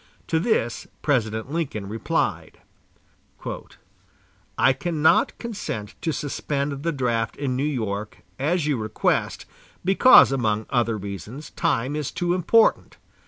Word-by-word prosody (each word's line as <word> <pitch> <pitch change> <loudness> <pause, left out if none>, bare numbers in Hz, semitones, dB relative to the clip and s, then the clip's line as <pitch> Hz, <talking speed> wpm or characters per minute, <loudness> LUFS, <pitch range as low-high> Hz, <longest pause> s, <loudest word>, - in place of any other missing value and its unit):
To 160 - +2
this 160 - 0 0.2
President 110 -3 0
Lincoln 140 -11 -3
replied: 110 +2 -2 2.0
"I 135 - +5
cannot 160 +1 +2
consent 155 - -5
to 160 - 0
suspend 140 -1 -3
the 170 +2 0
draft 120 -5 -1
in 135 -3 -2
New 130 - -1
York, 110 -8 -3 0.2
as 155 +4 +1
you 150 -3 +1
request, 110 -1 -1 0.4
because, 195 - +7
among 110 -5 0
other 115 -3 +1
reasons, 100 - -7
time 130 +4 0
is 150 -3 -2
too 175 +3 -1
important.... 185 +6 +3
135 Hz, 120 wpm, -24 LUFS, 110-155 Hz, 2.0 s, because